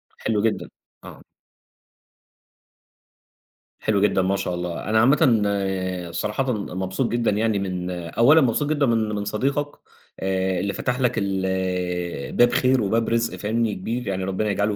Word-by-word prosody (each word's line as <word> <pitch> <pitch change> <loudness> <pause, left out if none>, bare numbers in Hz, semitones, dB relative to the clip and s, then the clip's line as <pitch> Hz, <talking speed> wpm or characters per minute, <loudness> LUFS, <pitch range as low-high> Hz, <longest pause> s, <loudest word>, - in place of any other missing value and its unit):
حلو 105 -2 -1
جدًا، 110 0 -1 0.3
آه. - - -11 2.6
حلو 105 -2 +1
جدًا 100 -2 +3
ما 95 +1 +1
شاء 95 -2 -2
الله، 90 +2 -4
أنا 110 +1 +3
عامةً، 125 -1 +4 0.7
صراحةً 125 +9 -1
مبسوط 95 +2 -2
جدًا 120 -1 +1
يعني 105 0 +1
من 90 -2 -3
أولًا 115 - +3
مبسوط 135 +3 +1
جدًا 150 -2 +2
من 115 -3 +1
من 100 0 -3
صديقك 140 +8 -1 0.5
آآ، 95 -1 0
اللي 100 +2 -2
فتح 125 0 -2
لك 125 -2 +2
ال 95 -1 -1 0.9
باب 120 0 +6
خير 130 -1 +3
وباب 115 +3 +1
رِزق 115 0 0
فاهمني، 110 0 -1
كبير 115 +6 -4
يعني، 95 -1 -2
ربنا 95 +3 -1
يجعله 105 +1 0
105 Hz, 140 wpm, -23 LUFS, 95-120 Hz, 2.6 s, باب